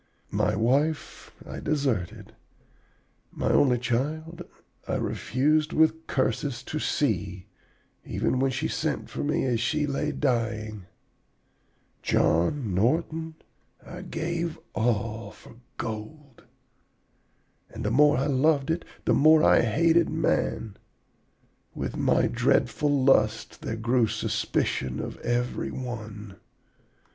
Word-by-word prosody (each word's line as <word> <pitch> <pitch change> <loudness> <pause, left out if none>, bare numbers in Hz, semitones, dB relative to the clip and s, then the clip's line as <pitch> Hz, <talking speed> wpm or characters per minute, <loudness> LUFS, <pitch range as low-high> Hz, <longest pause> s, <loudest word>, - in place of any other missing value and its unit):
My - - +1
wife 140 +8 0
I - - -7
deserted. 130 - -2 1.0
My - - -1
only 125 -3 +4
child 150 +8 -2 0.5
I - - -1
refused, 150 +5 0
with 160 +1 +2
curses, 130 0 -1
to 155 - -4
see, 100 - -1 0.6
even 130 - -1
when 135 +1 +2
she 140 +5 -2
sent 155 -2 -3
for - - -3
me 150 +1 0
as 120 -3 +1
she 150 +6 0
lay 145 +1 -1
dying. 110 -7 -2 1.1
John 95 - +1
Norton, 160 - 0 0.5
I 180 +1 -8
gave 170 -1 -3 0.2
all 115 0 -1
for 115 - -16 0.2
gold. 120 +5 -7 1.2
And 110 0 -7
the 105 - 0
more 145 +4 +5
I 135 - +1
loved 145 +1 +2
it, 170 +1 -1 0.2
the - - +3
more 155 +1 +6
I - - +6
hated 165 +9 +3
man. 135 -9 -1 1.0
With - - -4
my - - +2
dreadful 150 - +1
lust 110 -4 +2
there 115 - -3
grew 115 +1 +2
suspicion 65 -9 -1
of - - -5
every 120 +1 -1
one. 110 -5 -7
130 Hz, 115 wpm, -26 LUFS, 110-155 Hz, 1.2 s, more